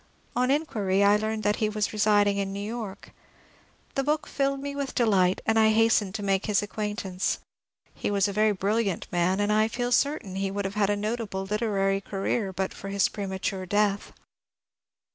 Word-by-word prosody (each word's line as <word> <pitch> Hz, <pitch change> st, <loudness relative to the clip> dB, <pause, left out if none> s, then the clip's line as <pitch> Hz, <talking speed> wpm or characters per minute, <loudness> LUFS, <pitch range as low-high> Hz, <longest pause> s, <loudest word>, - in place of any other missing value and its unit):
On 250 Hz, +1 st, +2 dB
inquiry 210 Hz, -10 st, +1 dB
I 200 Hz, +1 st, +6 dB
learned 215 Hz, +1 st, -2 dB
that 205 Hz, 0 st, +1 dB
he 215 Hz, -, +1 dB
was 210 Hz, 0 st, -2 dB
re 215 Hz, -, -5 dB
siding 205 Hz, -1 st, +4 dB
in 195 Hz, -1 st, -1 dB
New 200 Hz, -, -5 dB
York. 220 Hz, -4 st, -6 dB, 0.8 s
The 275 Hz, -, 0 dB
book 300 Hz, +2 st, 0 dB
filled 275 Hz, 0 st, -1 dB
me 280 Hz, 0 st, -5 dB
with 280 Hz, -2 st, -4 dB
delight, 195 Hz, -6 st, +3 dB
and 225 Hz, 0 st, +3 dB
I 220 Hz, 0 st, +5 dB
hastened 220 Hz, -3 st, +3 dB
to 210 Hz, -, -4 dB
make 195 Hz, 0 st, 0 dB
his 210 Hz, -1 st, +2 dB
acquaintance. 205 Hz, -3 st, -2 dB, 0.6 s
He -, -, -3 dB
was 200 Hz, 0 st, +2 dB
a 200 Hz, -, -4 dB
very 215 Hz, +1 st, +3 dB
brilliant 200 Hz, 0 st, 0 dB
man, 180 Hz, +2 st, +1 dB
and 205 Hz, +1 st, +2 dB
I 215 Hz, +1 st, +3 dB
feel 245 Hz, +2 st, -3 dB
certain 280 Hz, -8 st, +1 dB
that 190 Hz, -, -4 dB
he 195 Hz, 0 st, 0 dB
would 200 Hz, +1 st, -3 dB
have 195 Hz, -, -3 dB
had 205 Hz, -1 st, +1 dB
a 205 Hz, -, +2 dB
notable 210 Hz, -2 st, -3 dB
lit 210 Hz, +3 st, -2 dB
erary 195 Hz, -3 st, +1 dB
career 195 Hz, +1 st, -2 dB
but 190 Hz, +1 st, -3 dB
for 195 Hz, -, -8 dB
his 200 Hz, 0 st, +2 dB
premature 190 Hz, -1 st, -4 dB
death. 205 Hz, +1 st, +1 dB
205 Hz, 200 wpm, -27 LUFS, 195-220 Hz, 0.8 s, I